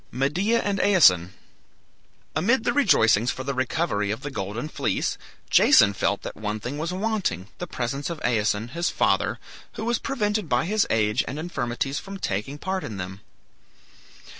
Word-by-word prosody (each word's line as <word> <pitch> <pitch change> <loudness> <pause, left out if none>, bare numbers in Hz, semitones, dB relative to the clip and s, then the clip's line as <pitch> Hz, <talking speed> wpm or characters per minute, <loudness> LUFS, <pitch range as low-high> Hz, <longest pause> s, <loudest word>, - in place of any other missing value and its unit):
MEDEA 175 - +1
AND 200 -1 -1
AESON 95 - +5 1.0
Amid 220 - +2
the - - +1
rejoicings 120 - +4
for 130 - -3
the 140 +1 -2
recovery 130 -5 -1
of 110 +4 -3
the 145 - -5
Golden 105 +4 -4
Fleece, - - -1 0.4
Jason 100 - +6
felt 100 0 -1
that - - -6
one 105 0 -3
thing 125 +7 -5
was 165 +3 -2
wanting, 190 - -2
the 175 - -4
presence 135 +1 -3
of 170 -2 -5
Aeson, 110 -1 0
his 170 +6 -1
father, - - +1 0.4
who 220 - -5
was 235 -1 +1
prevented 210 - -1
by 125 - +2
his 210 +3 +1
age 105 -1 +2
and 140 - -5
infirmities 135 -4 -2
from 195 0 -8
taking 105 - -3
part 190 +4 -3
in 105 - -6
them. 95 +1 -6
140 Hz, 165 wpm, -25 LUFS, -, 1.0 s, Jason